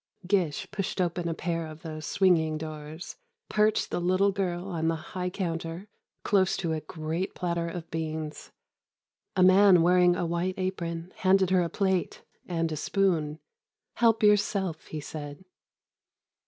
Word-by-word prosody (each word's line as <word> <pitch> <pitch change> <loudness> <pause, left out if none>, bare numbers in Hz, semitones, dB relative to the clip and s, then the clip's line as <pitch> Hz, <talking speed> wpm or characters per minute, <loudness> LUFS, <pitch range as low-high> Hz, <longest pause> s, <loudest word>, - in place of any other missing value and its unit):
Gish 180 -6 0
pushed 200 -1 -3
open 175 -1 0
a 165 - -2
pair 165 -1 -2
of 155 0 -11
these 155 -2 -6
swinging 165 -5 +3
doors, 155 - -7 0.3
perched 215 0 +2
the - - -1
little 185 +3 +3
girl 185 -2 -2
on 165 -3 -1
the 165 - +2
high 180 +3 -4
counter, 170 0 -4 0.3
close 190 -2 +2
to 165 -3 -1
a 155 - -2
great 160 +4 -4
platter 170 -2 -1
of 170 -1 -7
beans. 155 -1 -4 0.8
A 185 - +4
man 185 -1 +7
wearing 180 0 +5
a 175 - -1
white 170 +2 -1
apron 175 -2 -3
handed 190 -1 +3
her 185 -1 +4
a 170 - -1
plate 190 0 -1 0.2
and 165 -2 -1
a - - -2
spoon: 160 -4 0 0.6
"Help 225 -2 +3
yourself," 200 -5 +2
he 155 - -5
said. 145 +3 -8
175 Hz, 150 wpm, -28 LUFS, 160-190 Hz, 0.8 s, man